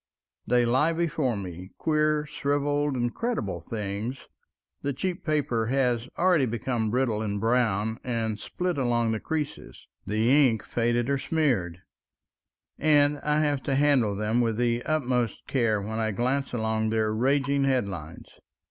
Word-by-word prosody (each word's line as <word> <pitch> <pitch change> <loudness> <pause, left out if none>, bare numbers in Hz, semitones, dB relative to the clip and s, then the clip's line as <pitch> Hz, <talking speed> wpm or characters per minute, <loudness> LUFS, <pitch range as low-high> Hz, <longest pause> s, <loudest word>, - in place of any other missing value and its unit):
They 120 -1 +3
lie 130 +8 +2
before 155 -8 0
me—queer, 150 - -1
shriveled, 145 -1 0
incredible 120 - -2
things; 105 +6 -5 0.5
the 140 0 -1
cheap 180 +6 -3
paper 135 -8 0
has 125 -2 0
already 175 -7 +3
become 115 0 -1
brittle 120 -2 0
and 100 -2 -2
brown 110 -1 +1
and 115 -4 -2
split 180 - -3
along 120 -3 +1
the 110 - -1
creases, 150 - -5 0.2
the 120 +7 +4
ink 110 -2 -3
faded 120 0 0
or 140 -1 +1
smeared, 120 - 0 1.0
and 145 -1 +3
I 150 +1 +1
have 145 -3 +1
to 135 - -1
handle 135 -7 +3
them 105 +4 +1
with 115 -2 0
the 120 0 +1
utmost 125 -7 -1
care 115 -5 +1
when 110 +3 -4
I 110 -1 0
glance 130 +6 -1
among 110 -2 0
their 110 -1 +1
raging 140 +4 +1
headlines. 100 - -3
120 Hz, 140 wpm, -27 LUFS, 110-145 Hz, 1.0 s, the